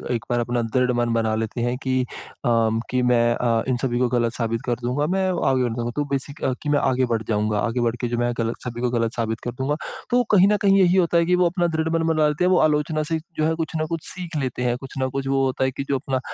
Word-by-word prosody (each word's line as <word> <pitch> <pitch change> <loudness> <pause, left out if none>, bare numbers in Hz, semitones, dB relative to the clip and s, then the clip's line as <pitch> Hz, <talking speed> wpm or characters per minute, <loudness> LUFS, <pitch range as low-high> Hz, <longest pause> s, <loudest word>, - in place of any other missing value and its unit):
एक 115 - -4
बार 120 - +1
अपना 120 0 0
दृढ़ 125 +2 +1
मन 120 -1 +1
बना 110 -1 +1
लेते 110 +2 -3
हैं। 120 +1 0
कि 130 -1 +1
अ, 125 - -2 0.8
कि 125 0 +1
मैं 120 -1 +3
अ, 115 -2 +1
इन 130 -2 +1
सभी 120 -2 0
को 125 - +3
गलत 120 -1 +1
साबित 115 -1 -2
कर 120 - 0
दूँगा, 130 +5 0
मैं 190 +2 +1 0.2
आगे 130 -1 +2
बढ़ 120 -2 -1
जाऊँगा। 120 0 -2
तो 150 - 0
बेसिक 140 +2 -3 0.2
कि 150 - -2
मैं 145 -1 +3
आगे 130 -1 +2
बढ़ 115 -2 -1
जाऊँगा। 105 -1 +1
आगे 120 +3 -1
बढ़ 115 0 +1
के 120 - 0
जो 120 0 -2
मैं 120 0 +1
गलत, 115 0 -1
सभी 120 -1 -5
को 125 - +1
गलत 115 -1 0
साबित 115 -1 -2
कर 120 - -3
दूँगा। 130 +4 -2 0.4
तो 245 0 +4
कहीं 195 -2 +6
न 210 - +3
कहीं 195 -1 +4
यही 180 0 +4
होता 175 -2 +3
है 170 - +3
कि 180 +1 +3
वो 180 0 +3
अपना 175 -1 0
दृढ़ 160 0 0
मन - - 0
बना 155 -1 +3
लेते 150 +4 -1
हैं। 180 - +3
वो 180 - +4
आलोचना 155 0 +1
से 165 - +1 0.2
जो 155 - +3
है 160 - +2
कुछ 160 -1 -3
न - - 0
कुछ 165 -1 -4
सीख 175 -2 -6
लेते 130 -2 -3
हैं। 120 -1 +1
कुछ 135 +1 -10
न 130 - 0
कुछ 135 +1 -4
वो 135 0 +2
होता 130 0 -1
है 130 - +1
कि 135 - -4
जो 140 - +2
अपना 135 -1 -2
130 Hz, 285 wpm, -23 LUFS, 120-155 Hz, 0.8 s, कहीं